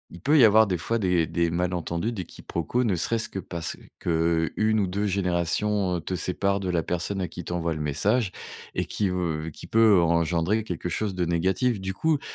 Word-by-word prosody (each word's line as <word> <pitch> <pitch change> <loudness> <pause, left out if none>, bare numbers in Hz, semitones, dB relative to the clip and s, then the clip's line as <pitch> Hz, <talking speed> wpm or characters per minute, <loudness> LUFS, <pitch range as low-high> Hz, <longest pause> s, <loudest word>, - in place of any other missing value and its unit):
il - - -10
peut 150 +2 +4
y 130 - +7
avoir, 110 0 +6
des 90 -2 0
fois, 115 +7 -1
des 90 -4 +2
des 85 0 0
malentendus, 90 +3 -1
des 95 -6 -5
quiproquos, 85 +13 -3
ne 105 -7 +1
serait-ce 115 +7 0
que 95 - -5
parce 85 -3 -5 0.2
qu'1 85 +6 +1
ou - - +2
2 100 +3 -1
générations, 95 +1 0
heu, 85 - -3
te 95 - -5
séparent 100 +3 0
de 95 - -3
la 85 -2 +1
personne 90 +4 -2
à 90 - -1
qui 90 - -8
tu 90 - -4
envoies 85 -1 -1
le 75 - -5
message 95 - +1 0.4
et - - +1
qui 105 - -1
veut 80 -3 -2
qui - - -10
peut 110 -5 +5
en 85 - +2
engendrer 85 +5 +1
quelque 90 -2 -4
chose 100 +2 -2
de 90 - 0
négatif. 95 +7 +1
Du 95 0 -3
coup, 155 +7 +1
90 Hz, 215 wpm, -26 LUFS, 85-105 Hz, 0.4 s, y